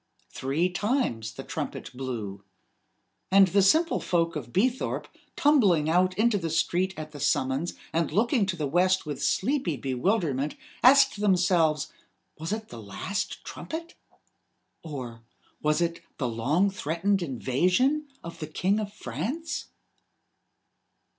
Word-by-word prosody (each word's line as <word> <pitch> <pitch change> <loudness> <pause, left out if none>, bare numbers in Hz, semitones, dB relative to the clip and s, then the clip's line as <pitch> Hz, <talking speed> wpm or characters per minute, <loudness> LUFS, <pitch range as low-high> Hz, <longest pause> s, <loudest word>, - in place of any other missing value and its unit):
Three 140 +7 0
times 185 - -1
the - - -7
trumpet - - -5
blew. 110 -7 -5 0.9
And 195 0 +6
the 200 +3 +4
simple 320 - +4
folk 165 -2 0
of 125 -6 -5
Beethorpe, 245 - 0 0.3
tumbling 195 - +4
out 185 +2 +2
into 215 -1 +3
the 165 -2 -3
street 180 +3 0
at 155 0 -6
the 145 - -9
summons, 135 +2 0 0.2
and 165 +1 0
looking 230 0 +2
to 190 - -1
the 155 -3 -2
west 180 +6 +2
with 145 -2 -5
sleepy 205 - 0
bewilderment, 140 - 0 0.3
asked 270 -4 +6
themselves: 175 -6 +2 0.5
Was 160 +3 -4
it 215 0 -4
the 115 - -9
last 150 - -4
trumpet? 330 +1 -6 0.9
Or 125 -7 -7 0.4
was 150 +2 +2
it 170 0 -1 0.2
the 130 - -1
long 140 - +1
threatened 190 +3 0
invasion 180 - +1 0.2
of 170 0 -8
the 155 - -4
King 190 +7 0
of 205 -2 -4
France? 205 - -4
175 Hz, 130 wpm, -27 LUFS, 145-205 Hz, 0.9 s, And